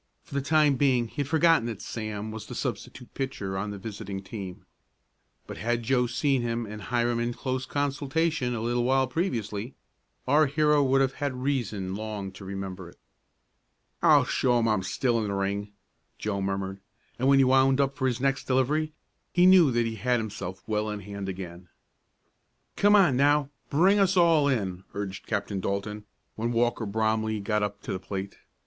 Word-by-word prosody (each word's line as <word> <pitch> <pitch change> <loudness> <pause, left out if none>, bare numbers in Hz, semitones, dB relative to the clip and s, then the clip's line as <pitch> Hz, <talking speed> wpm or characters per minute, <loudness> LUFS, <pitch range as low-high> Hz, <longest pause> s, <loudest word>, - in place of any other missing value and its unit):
For - - -15
the 140 - 0
time 150 -1 +3
being 125 -4 +2
he - - -21
had 140 -2 -1
forgotten 160 -4 +4
that 110 -4 -5
Sam 110 -1 -5
was 110 -1 -7
the - - -7
substitute 125 - -5
pitcher 105 -8 -4
on 100 +2 -2
the 100 - -5
visiting 100 -1 -6
team, 95 -2 -8 0.8
but - - -8
had 115 +6 -1
Joe 125 +1 +2
seen 130 +2 +1
him 115 0 -2
and 105 0 -8
Hiram 120 +3 0
in 120 0 -1
close 130 0 -3
consultation 145 -1 -1
a 110 - -3
little 120 +1 0
while 130 +1 +3
previously, 120 - -3 0.5
our 150 +3 +5
hero 150 +1 +3
would 135 0 +3
have 135 0 +1
had 130 -3 -2
reason 110 -9 -1
long 105 -2 -5
to 95 - -12
remember 95 -2 -6
it. - - -19 1.0
"I'll - - +6
show 125 -2 +2
'em 115 -1 +2
I 110 - +3
am 100 - 0
still 115 +5 0
in 105 - -2
the 100 - -2
ring!" 100 +1 -2 0.5
Joe 100 -2 -2
murmured, 95 0 -3 0.4
and 130 - +1
when 140 0 +6
he 135 - +6
wound 130 +1 +4
up 135 -1 +1
for 130 -2 0
his 120 -3 -1
next 135 +1 0
delivery 150 +4 +1 0.4
he 180 0 +4
knew 185 -5 +7
that 120 -2 +1
he 115 -1 -3
had 125 +3 +1
himself 100 -4 -6
well 105 0 -1
in 105 -1 -4
hand 100 0 -6
again. 90 -2 -8 1.1
"Come 205 +1 +5
on 180 -10 +5
now, 145 +1 +3 0.2
bring 190 +8 +4
us 195 -1 +3
all 165 -4 +5
in!" 95 -9 -1
urged 100 -1 -5
Captain 100 -2 -2
Dalton, 100 +2 -3 0.3
when 115 +2 -2
Walker 120 -1 0
Bromley 110 +1 0
got 105 +1 0
up 100 0 -3
to - - -3
the 95 - -3
plate. 95 +1 -6
120 Hz, 185 wpm, -27 LUFS, 100-135 Hz, 1.1 s, knew